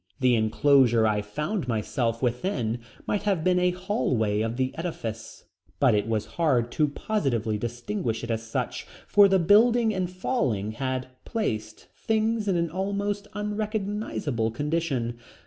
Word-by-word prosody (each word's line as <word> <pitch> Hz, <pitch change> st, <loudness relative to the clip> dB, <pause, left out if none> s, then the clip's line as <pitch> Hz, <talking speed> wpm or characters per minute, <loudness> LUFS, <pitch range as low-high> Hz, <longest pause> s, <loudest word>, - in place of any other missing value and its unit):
The 130 Hz, -2 st, +4 dB
enclosure 120 Hz, +1 st, +4 dB
I 105 Hz, -1 st, +2 dB
found 150 Hz, -, -3 dB
myself 115 Hz, +1 st, -1 dB
within 120 Hz, -, -1 dB, 0.3 s
might 205 Hz, -, 0 dB
have 195 Hz, -6 st, 0 dB
been 180 Hz, 0 st, +3 dB
a 180 Hz, 0 st, +3 dB
hallway 135 Hz, -, 0 dB
of 115 Hz, +2 st, -2 dB
the 130 Hz, 0 st, 0 dB
edifice, 115 Hz, -10 st, -5 dB, 0.4 s
but 130 Hz, -5 st, +5 dB
it 105 Hz, 0 st, +1 dB
was 110 Hz, -2 st, 0 dB, 0.2 s
hard 125 Hz, -7 st, +2 dB
to 150 Hz, +3 st, +2 dB
positively 130 Hz, -, -1 dB
distinguish 120 Hz, -, -3 dB
it 115 Hz, -, -3 dB
as 110 Hz, 0 st, -1 dB
such, 115 Hz, 0 st, -4 dB, 0.2 s
for 205 Hz, -1 st, +6 dB
the 190 Hz, 0 st, +4 dB
building 225 Hz, +6 st, +5 dB
in 185 Hz, -3 st, -1 dB
falling 175 Hz, -, -1 dB
had 130 Hz, +2 st, -3 dB
placed 110 Hz, -, -3 dB
things 220 Hz, 0 st, 0 dB
in 190 Hz, -, +2 dB
an 170 Hz, -2 st, 0 dB
almost 200 Hz, +2 st, -2 dB
unrecognizable 210 Hz, -, -2 dB
condition. 135 Hz, -3 st, -2 dB
140 Hz, 145 wpm, -26 LUFS, -, 0.4 s, for